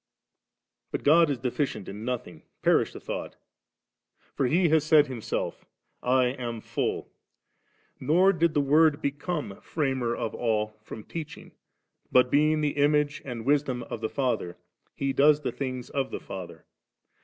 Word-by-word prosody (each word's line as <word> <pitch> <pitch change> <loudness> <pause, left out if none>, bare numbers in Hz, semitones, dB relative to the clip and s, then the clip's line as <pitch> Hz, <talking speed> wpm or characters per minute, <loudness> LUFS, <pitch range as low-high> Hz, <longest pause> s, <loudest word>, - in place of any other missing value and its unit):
But - - -4
God 165 +2 +6
is 140 - 0
deficient 125 -3 -2
in 105 +2 -7
nothing: 115 -10 -4 0.2
perish - - +3
the - - -9
thought! - - -5 1.0
for 135 - +1
He 170 +5 +3
has 155 -1 +4
said 155 -1 +5
Himself, 130 -5 -4 0.2
* - - -47 0.2
I - - +3
am 125 -2 -3
full - - -2
•.' - - -31 0.9
Nor 175 +8 +4
did 170 -2 +1
the 145 - +4
Word 150 +2 +4
become 145 - -3
Framer 130 -6 -1
of 115 -3 -3
all 110 -2 -1
firom 110 0 -9
teaching; 160 -3 -7 0.6
but 125 0 +4
being 155 +2 +3
the 150 -1 -1
Image 145 0 +2
and 120 -4 -6
Wisdom 135 -3 +1
of 115 - -7
the 110 - -1
Father, 125 -10 -2 0.4
He 135 0 -1
does 150 +2 +5
the 135 - -2
things 130 -3 -5
of 135 -1 -1
the - - -5
Father. 95 -2 -9
135 Hz, 155 wpm, -27 LUFS, 120-150 Hz, 1.0 s, God